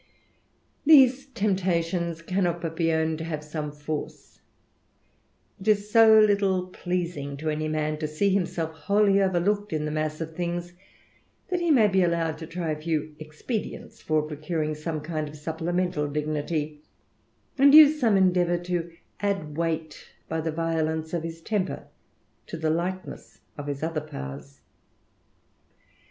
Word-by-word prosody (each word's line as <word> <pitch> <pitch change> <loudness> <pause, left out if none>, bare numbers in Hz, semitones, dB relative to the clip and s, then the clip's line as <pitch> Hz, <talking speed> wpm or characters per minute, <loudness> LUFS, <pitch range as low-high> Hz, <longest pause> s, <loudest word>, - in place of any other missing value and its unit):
These 275 -3 +6
temptations 175 -7 -1
cannot 175 -1 0
but 165 -1 -3
be 165 -1 +1
owned 160 0 0
to - - -4
have 155 -2 -4
som 150 0 -4
^* - - -18
force. 150 +1 -6 1.2
It 190 - -10
is 210 -1 +2
so 220 -1 +7
little 200 -3 +3
pleasing 170 -6 -3
to 155 +2 -2
any 155 +1 -2
man 155 0 -1
to 155 - -2
see 190 +6 +1
himse^V^ 170 -4 -1
wholly 200 +5 +2
overlooked 195 +3 +1
in 155 -1 -1
the 150 - -2
mass 155 0 -2
of 160 -1 -6
things, 175 0 -3 0.8
that 360 - 0
he 345 -1 0
may 240 -8 +6
\>^* 190 -1 +3
allowed 170 -2 0
to 160 - -7
try 170 -1 -3
a 155 0 -4
few 155 -1 -2
expedients 155 +9 -6
for 155 -1 +1
procuring 155 +1 -3
some 155 0 -4
kind 155 -1 -4
supplemental 165 0 -2
dignity, 150 0 -3 0.8
and 280 +2 +7
use 305 0 +9
some 225 -7 +3
endeavour 180 -2 +3
to 175 -1 -3 0.3
ad< 195 -8 -2
weight, 160 -1 -3 0.2
by 160 0 -2
the 160 0 -2
violence 160 0 -1
of 170 - 0
his 165 0 -7
temper, 200 +1 -2 0.6
to 165 - -6
the 160 -1 0
lightness 185 +3 -4
of 145 -1 -6
other 160 -1 -1
powers. 70 - -9
165 Hz, 145 wpm, -26 LUFS, 155-190 Hz, 1.2 s, use